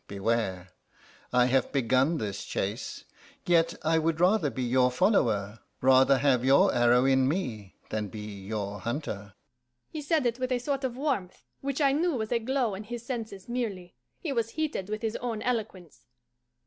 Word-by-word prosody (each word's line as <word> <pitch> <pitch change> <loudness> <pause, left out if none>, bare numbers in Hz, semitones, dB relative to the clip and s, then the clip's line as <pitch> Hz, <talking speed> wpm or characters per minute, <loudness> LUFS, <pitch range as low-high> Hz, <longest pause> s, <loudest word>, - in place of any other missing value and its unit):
Beware: 100 -3 -1 0.6
I 125 0 +4
have 130 +1 +1
begun 135 +4 +2
this 100 -5 -4
chase. 100 +4 -4 0.4
Yet 170 -1 +3
I 160 +1 +3
would 160 0 0
rather 180 -3 +3
be 130 +1 -4
your 125 +1 +3
follower, 115 - +1 0.2
rather 130 +1 +5
have 130 -2 +2
your 135 +2 +5
arrow 120 +1 +4
in 130 -1 +4
me, 120 - -3 0.2
than 105 -1 -2
be 105 +2 -8 0.3
your 105 -1 -3
hunter." 105 - -5 0.6
He 310 - -5
said 300 -1 +1
it 240 +1 0
with 255 0 -2
a 250 - +2
sort 275 +2 -2
of 250 -2 -2
warmth, 260 -11 -2
which 275 +2 -3
I 275 -1 +5
knew 320 +3 +1
was 220 -2 -3
a 240 - +2
glow 250 -2 0
in 200 +2 -6
his 240 +1 -7
senses 220 -7 -5
merely; 210 -8 -4 0.2
he 305 -5 -3
was 230 -3 0
heated 295 -11 -2
with 215 +1 -4
his 220 0 -1
own 230 -3 -4
eloquence. 205 - -4
165 Hz, 175 wpm, -28 LUFS, -, 0.6 s, rather